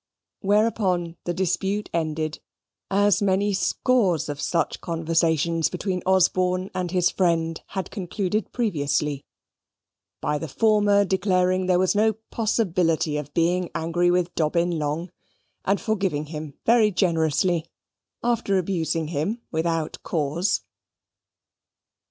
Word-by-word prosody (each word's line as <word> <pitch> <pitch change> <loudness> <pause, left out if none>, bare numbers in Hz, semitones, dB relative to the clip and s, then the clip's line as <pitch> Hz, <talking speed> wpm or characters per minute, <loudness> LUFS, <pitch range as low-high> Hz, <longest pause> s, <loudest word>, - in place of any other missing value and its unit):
Whereupon 195 -5 +1
the 175 - -1
dispute 190 +3 -1
ended 155 -1 -2 0.5
as 205 +1 +3
many 200 +1 +2
scores 195 - +1
of 145 -1 -4
such 170 - -1
conversations 165 -1 +1
between 185 -3 -3
Osborne 185 0 +2
and 185 -1 -2
his 180 0 +2
friend 165 -3 0 0.2
had 190 -2 -3
concluded 195 +2 -2
previously 150 - -1 1.0
by 150 0 -1
the 160 - -5
former 205 - +3
declaring 185 -1 +1
there 180 -1 +4
was 185 -1 +2
no 215 +1 +3 0.2
possibility 180 -8 +1
of 150 -1 -4
being 175 +1 +1
angry 170 +2 +1
with 180 0 +1
Dobbin 170 +2 +1
long, 155 +4 -3 0.5
and 195 +1 +2
forgiving 190 -9 -1
him 150 -2 -6
very 225 -2 +5
generously 170 -2 +1 0.5
after 230 -5 +1
abusing 165 -4 -1
him 185 +10 -2
without 160 -1 -1
cause. 160 +4 0
180 Hz, 115 wpm, -24 LUFS, 160-195 Hz, 1.0 s, very